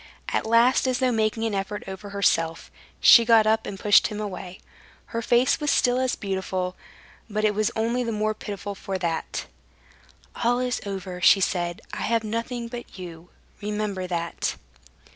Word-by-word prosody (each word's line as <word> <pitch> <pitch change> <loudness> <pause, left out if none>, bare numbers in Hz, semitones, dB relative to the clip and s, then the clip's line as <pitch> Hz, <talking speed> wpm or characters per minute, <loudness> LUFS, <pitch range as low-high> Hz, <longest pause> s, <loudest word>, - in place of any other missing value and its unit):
At - - -1
last, 235 +4 +4
as 255 -1 +1
though 255 0 +2
making 220 0 0
an 225 -2 -1
effort 195 +1 -3
over 190 +2 -7
herself, 165 -5 0 0.3
she 235 - +8
got 225 -1 +5
up 220 +1 +2
and 195 - -6
pushed 205 0 +5
him 210 -1 -6
away. 190 -3 -6 0.5
Her 230 - -1
face 240 +2 +3
was 295 -1 -1
still 250 -2 +3
as 260 -1 0
beautiful, 190 -2 -3 0.5
but 215 0 0
it 210 - +3
was 215 0 +1
only 235 +3 0
the 230 - -2
more 215 0 0
pitiful 205 -1 -6
for 195 0 -4
that. 170 -3 -3 1.0
"All 240 +1 +3
is 250 0 -1
over," 185 -2 -5
she 195 - +7
said; 175 -2 -1
"I - - -4
have 230 +1 +1
nothing 230 +2 -3
but 240 -3 -9
you. 175 -2 -9 0.3
Remember 210 -3 -3
that." 170 -1 -2
210 Hz, 170 wpm, -25 LUFS, 190-230 Hz, 1.0 s, she